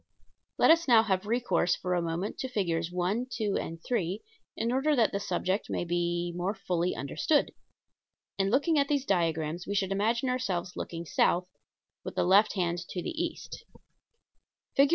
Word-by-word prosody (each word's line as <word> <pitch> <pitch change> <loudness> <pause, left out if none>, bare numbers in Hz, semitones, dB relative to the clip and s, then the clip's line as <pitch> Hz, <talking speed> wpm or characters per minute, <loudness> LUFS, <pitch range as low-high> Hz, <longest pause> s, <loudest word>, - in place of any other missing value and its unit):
Let - - +6
us 330 -1 +4
now 230 -3 +7
have 195 -1 -1
recourse, 200 -7 +1
for 180 - -3
a 175 - +1
moment, 170 +4 -3
to 260 - -3
Figs. 170 -7 -1
1, 185 +8 -1
2, 215 -5 -1
and 165 0 -5
3 200 -4 -2 0.3
in 230 - 0
order 280 +4 +2
that 235 -4 +3
the 200 - -1
subject 195 0 -1
may - - -2
be 175 0 -1
more 180 +4 -1
fully 180 -2 -1
understood. 285 - +1 0.9
In 195 0 +2
looking 285 +6 +3
at 280 - +2
these 285 -2 0
diagrams 165 - 0
we 200 - -2
should 195 -1 0
imagine 225 +6 +1
ourselves 195 -9 -2
looking 170 0 -5
South, 175 +3 +2 0.6
with - - -6
the - - +2
left 195 +4 +5
hand 175 -3 -1
to 180 - -4
the - - -3
East. 335 +1 -5
[Illustration: - - -24 1.0
FIG. 275 +1 +5
195 Hz, 175 wpm, -29 LUFS, 175-240 Hz, 1.0 s, now